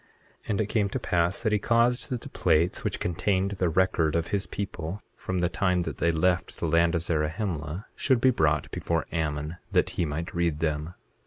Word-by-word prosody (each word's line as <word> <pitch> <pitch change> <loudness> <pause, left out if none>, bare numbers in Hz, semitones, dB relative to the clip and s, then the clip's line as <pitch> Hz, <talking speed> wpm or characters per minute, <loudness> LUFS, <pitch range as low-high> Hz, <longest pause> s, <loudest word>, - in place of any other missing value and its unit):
8:5 - - -16
And 105 0 +1
it - - +1
came 105 -1 +1
to - - -2
pass 85 +4 0
that 110 - +2
he 105 - +3
caused 120 +3 +2
that 125 -2 -2
the 140 - -8
plates 85 -5 +1
which - - -2
contained 95 +3 0
the 95 -3 0
record 80 -3 +2
of 85 0 0
his 100 +1 -1
people 95 -2 -4 0.2
from 95 -1 -3
the 90 - +3
time 90 0 +1
that 80 -6 -5
they 85 - +3
left 85 +2 +1
the 85 - -2
land 85 +2 +3
of 85 - 0
Zarahemla, 80 +2 -2
should 130 -3 +2
be 130 +2 +5
brought 75 - +1
before 85 -1 -1
Ammon, 80 0 -2
that - - +2
he 85 - -1
might 80 +4 -4
read 85 -3 0
them. 75 +2 -2
85 Hz, 210 wpm, -27 LUFS, 80-100 Hz, 0.2 s, be